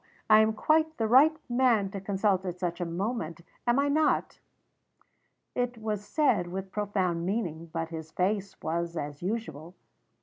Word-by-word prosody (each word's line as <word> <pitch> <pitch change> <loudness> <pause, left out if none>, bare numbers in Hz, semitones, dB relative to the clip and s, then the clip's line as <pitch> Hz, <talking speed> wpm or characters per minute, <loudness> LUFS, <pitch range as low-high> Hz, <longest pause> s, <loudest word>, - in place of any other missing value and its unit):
I 215 - +9
am 220 0 +4
quite 315 +7 +2
the 225 - 0
right 290 +7 +6
man 240 -6 +2
to 195 -1 -5
consult 195 -1 +1
at 180 -2 -4
such 175 -1 -2
a - - 0
moment, 170 -1 -3 0.3
am 240 +1 +4
I 280 +1 +3
not?" 305 +2 +1 1.1
It 245 -1 -1
was 215 -2 -3
said 205 - +1
with 190 +2 -5
profound 190 -5 -1
meaning; 170 -5 -2
but 165 -1 -3
his 160 -1 -7
face 195 +1 -1
was 170 +1 -2
as 145 -1 -5
usual. 175 -5 -4
195 Hz, 160 wpm, -29 LUFS, 170-230 Hz, 1.1 s, I